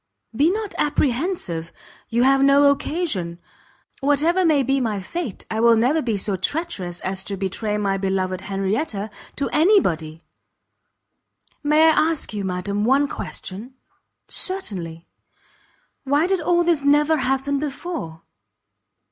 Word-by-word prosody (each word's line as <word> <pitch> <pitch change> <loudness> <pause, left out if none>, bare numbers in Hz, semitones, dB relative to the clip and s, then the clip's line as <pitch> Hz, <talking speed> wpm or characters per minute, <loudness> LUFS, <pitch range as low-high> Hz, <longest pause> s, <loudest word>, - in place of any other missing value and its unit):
"Be 290 +7 +4
not 415 0 -3
apprehensive; 260 - -1 0.4
you 235 +2 +2
have 270 +1 +4
no 280 +1 +6
occasion. 280 - -2 0.6
Whatever 305 +6 +2
may 305 -5 +3
be 270 +1 +1
my 215 -4 -1
fate, 240 - -5
I 220 - -1
will 230 0 +6
never 255 +8 +2
be 230 -6 -1
so 200 0 -1
treacherous 190 - -3
as 190 0 -3
to 200 - -4
betray 210 +2 -2
my 195 -2 0
beloved 190 -1 -1
Henrietta 200 +3 -2 0.2
to 280 - -1
any 380 +7 +5
body." 160 - -3 1.4
"May 300 +1 +4
I 320 0 +4
ask 310 -8 -5
you, 205 -1 -3
madam, 190 +2 -2
one 270 +5 +3
question?" 230 0 -7 0.5
"Certainly." 180 - -4 1.0
"Why 285 +3 +2
did 375 -1 0
all 345 +1 +2
this 335 -4 +1
never 295 +2 +4
happen 270 +1 0
before?" 280 - -5
260 Hz, 130 wpm, -22 LUFS, 195-305 Hz, 1.4 s, no